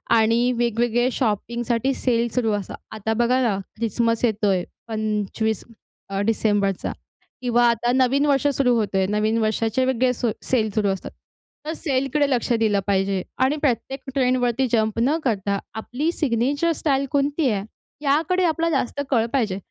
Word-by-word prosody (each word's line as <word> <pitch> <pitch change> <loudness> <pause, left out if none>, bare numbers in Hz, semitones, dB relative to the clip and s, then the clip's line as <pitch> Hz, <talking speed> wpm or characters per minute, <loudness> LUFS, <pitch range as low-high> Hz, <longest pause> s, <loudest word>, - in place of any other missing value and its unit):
आणि 230 +2 +3
वेगवेगळे 240 +1 +1
शॉपिंगसाठी 235 +2 -1
सेल 240 -3 +1
सुरू 235 -3 +1
असतात. 205 -3 -4
आता 220 +1 -2
बघा 240 +3 +2
ना, 225 -6 +1 0.2
ख्रिसमस 230 +1 0
येतोय, 205 -5 +1 0.2
25 215 -1 -2 0.5
अ, 195 0 -2
डिसेंबरचा, 205 -4 +1 0.5
किंवा 240 -1 +3
आता 235 +1 +1
नवीन 265 +2 +3
वर्ष 285 -1 +2
सुरू 250 -2 +2
होतो 210 -4 0
आहे, 190 - +3
नवीन 215 +2 +1
वर्षाचे 225 +3 +1
वेगळे 255 -1 +2
सो 235 -2 -1
सेल 225 -4 +1
सुरू 210 -2 +2
असतात, 195 -1 -4 0.5
तर 315 - -2
सेलकडे 280 -2 0
लक्ष 250 -2 0
दिलं 220 -3 +2
पाहिजे 195 -1 +1 0.2
आणि 275 +3 +1
प्रत्येक 270 0 -1 0.2
ट्रेंडवरती 255 -1 +2
जंप 220 -1 +1
न 280 +7 +2
करता, 200 -5 0
आपली 250 +8 -2
सिग्नेचर 285 +2 0
स्टाईल 275 -2 +1
कोणती 285 +1 +1
आहे? 200 -3 -1 0.4
याकडे 320 +6 +2
आपला 330 0 +1
जास्त 285 -2 -1
कल 230 -4 +3
पाहिजे, 220 -8 0
235 Hz, 150 wpm, -23 LUFS, 215-265 Hz, 0.5 s, आणि